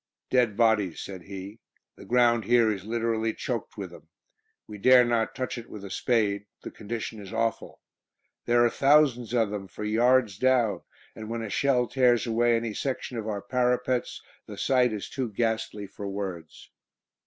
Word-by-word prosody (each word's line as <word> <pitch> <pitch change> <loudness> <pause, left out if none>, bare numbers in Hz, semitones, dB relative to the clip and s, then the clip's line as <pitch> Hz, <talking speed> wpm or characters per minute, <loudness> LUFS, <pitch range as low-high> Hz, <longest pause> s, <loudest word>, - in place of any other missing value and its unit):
"Dead 120 -5 +2
bodies," 110 -7 +2
said 95 -2 -7
he; 100 +4 -9 0.4
"the - - -13
ground 120 -2 +3
here 115 -1 +4
is 95 -2 -5
literally 115 0 -1
choked - - -4
with - - -6
them; - - -14 0.6
we 105 -1 -10
dare 125 +3 +6
not 115 -2 0
touch 130 -1 -3
it 120 - -12
with 100 -2 -9
a 95 - -8
spade; 105 -4 0 0.2
the - - -7
condition 110 +1 -6
is 100 -2 -10
awful. 115 0 -2 0.7
There 120 0 +4
are - - +4
thousands 135 -5 +3
of 115 -4 +1
them 100 -2 -5
for 100 - -8
yards 115 -1 +2
down, 130 -4 +2 0.3
and 110 0 -8
when 115 0 -3
a 110 - -6
shell 130 -1 +2
tears 125 -1 +2
away 120 0 +2
any 115 -1 -2
section 130 +1 -4
of 110 - -6
our 100 -2 -3
parapets 125 +2 -1 0.2
the - - -9
sight 125 -2 +2
is 105 -2 -5
too 130 -4 -3
ghastly 110 -1 -2
for 100 +1 -8
words." 95 -5 -6
115 Hz, 175 wpm, -27 LUFS, 105-125 Hz, 0.7 s, dare